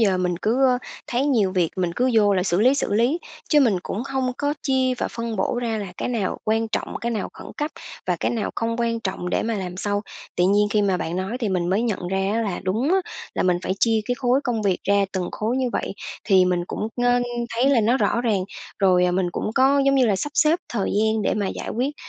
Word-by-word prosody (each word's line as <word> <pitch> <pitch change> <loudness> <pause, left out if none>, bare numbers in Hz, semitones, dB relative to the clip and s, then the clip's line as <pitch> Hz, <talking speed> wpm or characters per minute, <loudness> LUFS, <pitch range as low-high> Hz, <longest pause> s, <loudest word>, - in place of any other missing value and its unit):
giờ 195 -4 +3
mình 180 -1 0
cứ, 250 +5 +2
ơ, 250 -1 +3 0.3
thấy 250 +3 0
nhiều 215 -10 +2
việc 175 -4 +1
mình 180 -2 0
cứ 255 +1 +2
vô 205 -2 +4
là 180 - +1
xử 185 0 +1
lý, 255 +4 +5
xử 265 - -1
lý, 245 +10 +2 0.3
chứ 300 -2 +5
mình 230 -8 +4
cũng 225 +6 -4
không 265 -2 -1
có 285 +1 0
chia 260 -2 +1
và - - -1
phân 230 -2 -4
bổ 215 +5 0
ra 225 -2 -1
là 200 - -4
cái - - -3
nào 220 -6 -1
quan 225 +1 +1
trọng, - - -3
cái 235 - -2
nào 215 -4 -2
khẩn - - -11
cấp 295 +1 -2 0.4
và - - +1
cái - - +1
nào 225 -4 -2
không 230 0 -1
quan 230 -1 0
trọng 190 -4 -3
để - - +1
mà 225 0 -1
làm 180 -3 -4
sau. 205 +2 -1 0.3
Tự 180 - +3
nhiên 205 +1 +3
khi 210 0 +2
mà 190 -2 +2
bạn 170 0 -3
nói 190 +6 -2
thì 220 - 0
mình 180 -2 0
mới 205 +5 +2
nhận 200 -6 -2
ra 190 +1 0
á 230 - +1
là 200 -5 -3
đúng 225 - 0
á, 385 - +4 0.4
là - - 0
mình 180 -1 +3
phải 185 - -1
chia 225 -1 +3
cái 245 - -1
khối 255 +1 +2
công 230 -4 -1
việc 190 -3 +1
ra 200 0 +3
từng 185 -2 -2
khối 225 +4 -1
như 260 -1 +1
vậy, - - -2 0.3
thì 190 -3 +5
mình 180 -1 0
cũng, 215 - -3 0.2
ơ, 245 0 +4 0.3
thấy 250 +4 +3
là 245 -5 +4
nó 235 +5 +3
rõ 235 - +1
ràng, 215 -5 +1 0.4
rồi, 180 -2 +4
ờ, 180 - +2
mình 185 0 +1
cũng - - -2
có, 275 +2 +4
giống 275 - +4
như 260 -3 +4
là, 200 -3 +2
sắp 290 - -3
xếp 320 +3 +4
thời 210 -5 -1
gian 220 0 +2
để - - +1
mà 205 -2 -1
giải - - -5
quyết. 265 +6 -1
220 Hz, 265 wpm, -23 LUFS, 190-245 Hz, 0.4 s, lý